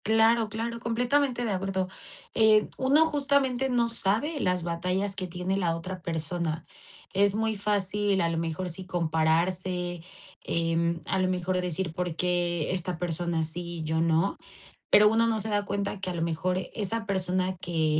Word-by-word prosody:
Claro 225 Hz, +1 st, +4 dB
claro, 230 Hz, +2 st, -4 dB
completamente 245 Hz, +2 st, +1 dB
de 220 Hz, -, 0 dB
acuerdo, 190 Hz, -1 st, -1 dB, 0.5 s
eh, 215 Hz, -1 st, +5 dB
uno 280 Hz, +5 st, +4 dB
justamente 280 Hz, -4 st, +1 dB
no 240 Hz, -2 st, +2 dB
sabe 230 Hz, +7 st, +1 dB
las 180 Hz, -6 st, 0 dB
batallas 180 Hz, +4 st, -1 dB
que 185 Hz, -2 st, -4 dB
tiene 180 Hz, +2 st, -2 dB
la 170 Hz, -4 st, +1 dB
otra 185 Hz, +2 st, -6 dB
persona. 165 Hz, 0 st, -2 dB, 0.5 s
Es 200 Hz, +1 st, +3 dB
muy 220 Hz, 0 st, 0 dB
fácil, 205 Hz, -1 st, 0 dB
a 170 Hz, -, +1 dB
lo 165 Hz, -1 st, -1 dB
mejor 165 Hz, +2 st, -3 dB
sí, 185 Hz, +2 st, -5 dB
compararse, 175 Hz, +1 st, 0 dB, 0.4 s
em, 170 Hz, 0 st, 0 dB
a 190 Hz, -, 0 dB
lo 185 Hz, -, +2 dB
mejor 185 Hz, 0 st, -1 dB
de 180 Hz, -, +1 dB
decir, 180 Hz, -1 st, -2 dB
¿por 180 Hz, -1 st, -3 dB
qué 175 Hz, -2 st, 0 dB
esta 180 Hz, -1 st, -2 dB
persona 170 Hz, -1 st, -1 dB
sí 160 Hz, +3 st, -3 dB, 0.2 s
y -, -, -4 dB
yo 160 Hz, +1 st, 0 dB
no? 165 Hz, +3 st, +1 dB, 0.5 s
Pero 210 Hz, 0 st, +7 dB
uno 230 Hz, +1 st, +3 dB
no 225 Hz, -1 st, +1 dB
se 215 Hz, +1 st, -1 dB
da 205 Hz, -1 st, 0 dB
cuenta 200 Hz, 0 st, -2 dB
que 185 Hz, -, -2 dB
a 180 Hz, -, -3 dB
lo 165 Hz, -, -1 dB
mejor 170 Hz, +2 st, -1 dB, 0.2 s
esa 220 Hz, +2 st, -2 dB
persona 185 Hz, -1 st, 0 dB
que 160 Hz, -3 st, 0 dB
185 Hz, 175 wpm, -27 LUFS, 170-215 Hz, 0.5 s, Pero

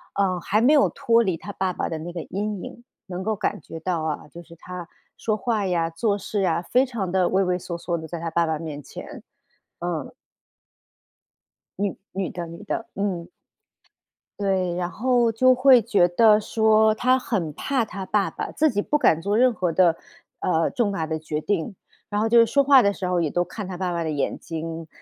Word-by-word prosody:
呃， 185 Hz, -3 st, +1 dB
还 210 Hz, +5 st, +1 dB
没 270 Hz, +6 st, +5 dB
有 290 Hz, -, +5 dB
脱 230 Hz, 0 st, +2 dB
离 185 Hz, -5 st, -1 dB
她 205 Hz, -, -8 dB
爸 190 Hz, -1 st, -1 dB
爸 -, -, -2 dB
的 160 Hz, -, -4 dB
那 170 Hz, +3 st, -6 dB
个 170 Hz, -1 st, -5 dB
阴 205 Hz, 0 st, -4 dB
影， 240 Hz, -, -10 dB, 0.2 s
能 185 Hz, 0 st, -5 dB
够 220 Hz, -, 0 dB
感 205 Hz, 0 st, -2 dB
觉 165 Hz, -, -9 dB
到 170 Hz, -1 st, -2 dB
啊， 155 Hz, -2 st, -3 dB
就 170 Hz, +4 st, -11 dB
是 170 Hz, 0 st, -15 dB
她 180 Hz, 0 st, -8 dB, 0.3 s
说 215 Hz, -1 st, -1 dB
话 215 Hz, -1 st, -1 dB
呀、 170 Hz, -3 st, 0 dB
做 205 Hz, +4 st, 0 dB
事 200 Hz, 0 st, -2 dB
啊， 170 Hz, -1 st, +1 dB
非 255 Hz, +8 st, +3 dB
常 225 Hz, -8 st, -4 dB
地 185 Hz, -1 st, +2 dB
畏 195 Hz, +1 st, +2 dB
畏 180 Hz, 0 st, +1 dB
缩 170 Hz, -1 st, -6 dB
缩 170 Hz, 0 st, -2 dB
的 160 Hz, -, -7 dB
在 170 Hz, -, -5 dB
她 165 Hz, 0 st, -3 dB
爸 170 Hz, 0 st, +2 dB
爸 160 Hz, -1 st, -2 dB
面 150 Hz, -3 st, -6 dB
前， 220 Hz, -, -10 dB, 0.6 s
嗯。 170 Hz, -5 st, -4 dB, 1.7 s
女 200 Hz, -1 st, -1 dB, 0.2 s
女 190 Hz, -1 st, -3 dB
的 175 Hz, -1 st, -5 dB
女 170 Hz, +5 st, -10 dB
的， 225 Hz, +2 st, -4 dB
嗯。 190 Hz, -4 st, -2 dB, 1.1 s
对， 190 Hz, -3 st, 0 dB
然 175 Hz, 0 st, -2 dB
后 240 Hz, +2 st, +2 dB
就 255 Hz, +3 st, +5 dB
会 255 Hz, -1 st, +6 dB
觉 195 Hz, -3 st, +3 dB
得 210 Hz, +4 st, +5 dB
说 220 Hz, 0 st, +3 dB
她 255 Hz, +3 st, +3 dB
很 185 Hz, -, -2 dB
怕 260 Hz, -, -1 dB
她 200 Hz, -3 st, -7 dB
爸 200 Hz, 0 st, +1 dB
爸， -, -, -5 dB
自 310 Hz, 0 st, +2 dB
己 205 Hz, -5 st, 0 dB
不 295 Hz, -, +1 dB
敢 165 Hz, -, +3 dB
做 205 Hz, +4 st, 0 dB
任 250 Hz, 0 st, +4 dB
何 180 Hz, -5 st, -1 dB
的 170 Hz, -1 st, +4 dB, 0.4 s
呃， 165 Hz, -2 st, +1 dB
重 230 Hz, -5 st, 0 dB
大 165 Hz, -5 st, -2 dB
的 160 Hz, 0 st, -3 dB
决 155 Hz, -1 st, -3 dB
定。 195 Hz, +3 st, -2 dB, 0.3 s
然 205 Hz, 0 st, 0 dB
后 225 Hz, -, +1 dB
就 235 Hz, +1 st, +6 dB
是 230 Hz, -, +7 dB
说 280 Hz, +4 st, +3 dB
话 275 Hz, -2 st, +7 dB
的 200 Hz, -, +2 dB
时 185 Hz, -, -4 dB
候 180 Hz, -1 st, +1 dB
也 160 Hz, -, 0 dB
都 175 Hz, +4 st, +1 dB
看 190 Hz, +3 st, -7 dB
她 185 Hz, -1 st, -6 dB
爸 180 Hz, 0 st, -2 dB
爸 170 Hz, -1 st, -1 dB
的 160 Hz, -, -2 dB
眼 145 Hz, -2 st, -1 dB
睛， 165 Hz, 0 st, -6 dB
190 Hz, 230 characters per minute, -24 LUFS, 170-220 Hz, 1.7 s, 是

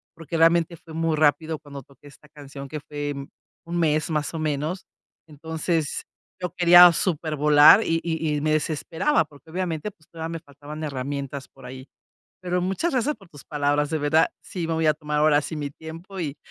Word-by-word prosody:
Porque 165 Hz, 0 st, -5 dB
realmente 165 Hz, +1 st, +3 dB
fue 160 Hz, 0 st, -14 dB
muy 165 Hz, 0 st, 0 dB
rápido 155 Hz, +1 st, +2 dB
cuando 140 Hz, -2 st, -10 dB
toqué 140 Hz, +2 st, -19 dB
esta 150 Hz, +1 st, -18 dB
canción, 140 Hz, -2 st, -10 dB
que 155 Hz, -, -5 dB
fue 145 Hz, 0 st, -4 dB, 0.5 s
un 170 Hz, +1 st, -4 dB
mes 155 Hz, -1 st, +1 dB
más 150 Hz, -2 st, -1 dB
o -, -, -3 dB
menos. 155 Hz, +4 st, -2 dB, 0.4 s
Entonces, 160 Hz, +1 st, -3 dB, 0.4 s
yo 180 Hz, -2 st, -4 dB
quería 175 Hz, 0 st, +9 dB
supervolar, 150 Hz, 0 st, +5 dB
y 165 Hz, 0 st, 0 dB
y 160 Hz, -2 st, -1 dB
y -, -, -3 dB
me 155 Hz, +1 st, +1 dB
desesperaba 160 Hz, -, 0 dB
porque, 145 Hz, +1 st, -19 dB
obviamente, 175 Hz, 0 st, -3 dB
pues 160 Hz, -6 st, -29 dB
todavía 165 Hz, -1 st, -6 dB
me 165 Hz, 0 st, -5 dB
faltaban 145 Hz, +1 st, -10 dB
herramientas 140 Hz, -1 st, -4 dB
por -, -, -17 dB
ahí. 130 Hz, +1 st, -9 dB, 0.6 s
Pero 180 Hz, 0 st, -1 dB
muchas 190 Hz, -, -1 dB
gracias 265 Hz, +3 st, +1 dB
por 195 Hz, -5 st, -19 dB
tus 145 Hz, -4 st, -14 dB
palabras. 145 Hz, 0 st, 0 dB
De 160 Hz, -, 0 dB
verdad 155 Hz, +3 st, +3 dB, 0.2 s
sí 175 Hz, -3 st, -5 dB
me 165 Hz, -, -1 dB
voy 160 Hz, -1 st, 0 dB
a 155 Hz, -, +4 dB
tomar 150 Hz, -1 st, -3 dB
ahora 150 Hz, -1 st, +4 dB
sí 155 Hz, -, -6 dB
mi 145 Hz, -2 st, -4 dB
tiempo 165 Hz, +6 st, -10 dB
y, 150 Hz, -4 st, -3 dB
155 Hz, 190 wpm, -24 LUFS, 145-165 Hz, 0.6 s, quería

